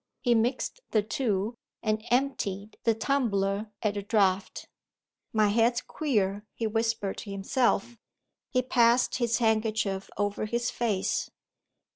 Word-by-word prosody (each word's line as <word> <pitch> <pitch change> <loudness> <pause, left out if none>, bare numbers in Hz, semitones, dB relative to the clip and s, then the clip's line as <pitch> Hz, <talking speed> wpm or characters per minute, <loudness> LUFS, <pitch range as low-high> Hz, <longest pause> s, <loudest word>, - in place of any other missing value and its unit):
He 245 - +3
mixed 245 - 0
the 215 -2 +2
two, 215 -1 -1 0.3
and 215 -1 0
emptied 220 -6 -1
the 225 -1 +4
tumbler 215 -5 0
at 210 -1 +1
a - - -1
draught. 195 -2 +1 0.6
"My 215 -2 +3
head's 230 +3 +3
queer," 205 -9 -1
he 230 - -2
whispered 225 -2 -1
to 210 - -8
himself. 225 +3 0 0.5
He 255 -2 +1
passed 240 0 +3
his 235 -2 +1
handkerchief 220 -4 0
over 205 +1 -1
his 235 +3 -1
face. 215 -6 -1
220 Hz, 125 wpm, -28 LUFS, 205-240 Hz, 0.6 s, the